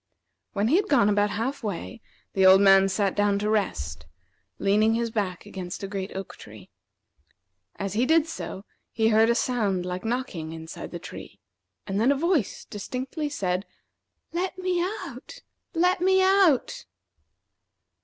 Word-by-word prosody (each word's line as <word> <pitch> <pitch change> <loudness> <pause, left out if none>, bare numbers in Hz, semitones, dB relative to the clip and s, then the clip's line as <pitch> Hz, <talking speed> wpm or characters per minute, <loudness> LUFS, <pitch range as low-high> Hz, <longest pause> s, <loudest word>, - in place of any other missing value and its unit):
When 205 +3 +1
he 320 - +5
had 405 +1 0
gone 210 -8 +4
about 205 0 +2
half 235 +7 -3
way, 215 +2 -5 0.3
the 190 - +2
old 190 0 +8
man 195 -1 +6
sat 195 0 0
down 205 -1 +2
to 210 +1 -1
rest, 80 - -2 0.5
leaning 215 +3 +3
his 230 0 -1
back 195 -5 -3
against 185 0 -7
a - - -2
great 195 -1 -5
oak 195 -1 -7
tree. 105 -3 -13 1.0
As 195 -1 -4
he 240 +4 +1
did 320 0 +4
so, 215 -11 -7 0.3
he 220 -1 +2
heard 220 +1 +4
a 235 - +3
sound 210 -8 0
like 180 0 -4
knocking 225 - -3
inside 160 0 -8
the 175 - -6
tree, 175 - -10 0.5
and 200 +1 -1
then 250 +5 +4
a - - +3
voice 315 - 0
distinctly 260 - -4
said: 190 -8 -2 0.7
"Let 365 +2 -2
me 365 -1 0
out! 370 - -6 0.3
let 360 +2 +2
me 380 +1 +4
out!" 375 - +3
215 Hz, 155 wpm, -26 LUFS, 195-280 Hz, 1.0 s, old